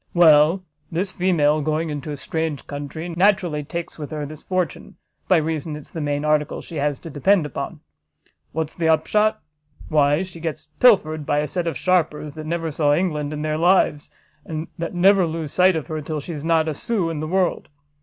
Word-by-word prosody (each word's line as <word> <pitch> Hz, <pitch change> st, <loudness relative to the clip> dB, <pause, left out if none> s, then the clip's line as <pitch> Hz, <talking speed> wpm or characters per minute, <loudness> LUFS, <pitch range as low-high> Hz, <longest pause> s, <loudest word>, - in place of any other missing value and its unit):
Well, 165 Hz, +2 st, +6 dB, 0.3 s
this 185 Hz, +4 st, -1 dB
female, 155 Hz, -5 st, +2 dB
going 155 Hz, +2 st, -1 dB
into 145 Hz, 0 st, -5 dB
a 145 Hz, -, -4 dB
strange 160 Hz, 0 st, -3 dB
country, 145 Hz, +4 st, -6 dB
naturally 175 Hz, -3 st, +2 dB
takes 170 Hz, +3 st, -6 dB
with 150 Hz, -, -5 dB
her 150 Hz, -2 st, -4 dB
this 155 Hz, +1 st, -9 dB
fortune, 185 Hz, -5 st, -3 dB, 0.3 s
by 185 Hz, -, +5 dB
reason 155 Hz, -1 st, -2 dB
it's 150 Hz, -, -8 dB
the 165 Hz, -, -5 dB
main 145 Hz, 0 st, -1 dB
article 150 Hz, -1 st, +1 dB
she 165 Hz, -, -8 dB
has 145 Hz, -1 st, 0 dB
to 165 Hz, -, -8 dB
depend 165 Hz, +5 st, +3 dB
upon; 150 Hz, -, -5 dB, 0.7 s
what's 160 Hz, -1 st, -3 dB
the 165 Hz, -2 st, 0 dB
upshot? 210 Hz, +7 st, +2 dB, 0.5 s
why 150 Hz, +2 st, +3 dB
she 180 Hz, -3 st, -10 dB
gets 160 Hz, -2 st, -5 dB
pilfered 155 Hz, -11 st, +4 dB
by 145 Hz, -, +1 dB
a 150 Hz, 0 st, +1 dB
set 175 Hz, +3 st, -2 dB
of 165 Hz, -, -2 dB
sharpers 155 Hz, -5 st, 0 dB
that 155 Hz, 0 st, -8 dB
never 165 Hz, -1 st, -2 dB
saw 145 Hz, -1 st, +2 dB
England 150 Hz, -4 st, -1 dB
in 150 Hz, 0 st, -4 dB
their 155 Hz, 0 st, -1 dB
lives, 170 Hz, -4 st, +3 dB, 0.3 s
and 155 Hz, 0 st, -5 dB
that 170 Hz, +2 st, -4 dB
never 190 Hz, 0 st, +5 dB
lose 160 Hz, -2 st, -4 dB
sight 185 Hz, 0 st, +5 dB
of 160 Hz, -, -2 dB
her 155 Hz, -1 st, -4 dB
till 155 Hz, +1 st, -4 dB
she 145 Hz, -, -7 dB
has 150 Hz, -3 st, -6 dB
not 165 Hz, -1 st, +2 dB
a 155 Hz, -, -1 dB
sous 180 Hz, +1 st, -1 dB
in 155 Hz, -, -4 dB
the 155 Hz, -, -3 dB
world. 185 Hz, +1 st, 0 dB
160 Hz, 200 wpm, -22 LUFS, 150-175 Hz, 0.7 s, Well